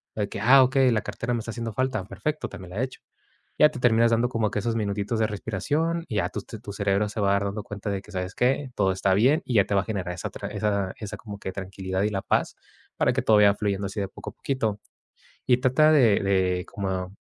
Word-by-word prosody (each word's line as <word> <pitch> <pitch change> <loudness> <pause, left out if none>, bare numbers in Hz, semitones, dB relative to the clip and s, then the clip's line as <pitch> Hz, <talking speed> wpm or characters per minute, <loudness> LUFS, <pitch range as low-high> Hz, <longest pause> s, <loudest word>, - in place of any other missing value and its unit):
De 105 -2 -1
que: - - -6
"Ah, 130 +5 +7
okey. 130 0 +3
La 110 -2 +1
cartera 120 - -4
me 120 - 0
está 115 +1 -6
haciendo 115 0 -4
falta, 130 -3 -1
perfecto, 150 +11 -3
también 95 -3 -10
la 105 +7 -2
hecho". 130 0 -5 0.6
Ya 150 - +8
te 150 -4 -8
terminas 115 -1 +4
dando 115 +1 +2
como 115 -4 0
que - - -1
esos 115 +2 -1
minutitos 105 +1 -1
de 110 - +3
respiración 145 - -2
y 105 - -3
ya 90 -3 +1
tu - - -5
te 110 - -9
tu 105 -2 -8
cerebro 100 0 0
se 105 - -6
va 100 -1 +2
a - - +4
dar 100 0 +1
dando 100 +1 -3
cuenta 105 -2 -6
de 100 -1 -2
que, 105 - -15
¿sabes 90 0 -4
qué? 130 +2 +1
Todo 95 -2 +2
está 95 0 +1
bien 135 - +4
y 125 - -2
ya 100 -3 +5
te - - -3
va 100 - +4
a - - -7
generar 95 -5 -3
esa 85 - -5
tra - - -7
esa 100 -3 -1
esa 105 -1 -6
como 100 -1 -9
que 95 - -5
tranquilidad 95 0 -4
y 105 - +2
la 100 -2 -2
paz - - 0 0.4
para - - +2
que - - -1
todo 110 - +5
vaya 105 -1 +6
fluyendo 100 -1 -1
así 100 +2 -5
de 100 - -1
poco 95 - -9
a - - -29
poquito. 110 -7 -2 0.7
Y 125 -1 +4
trata 130 +5 +4
de 120 -9 +5
de 95 -2 +1
como 95 -1 -4
105 Hz, 255 wpm, -25 LUFS, 100-120 Hz, 0.7 s, Ya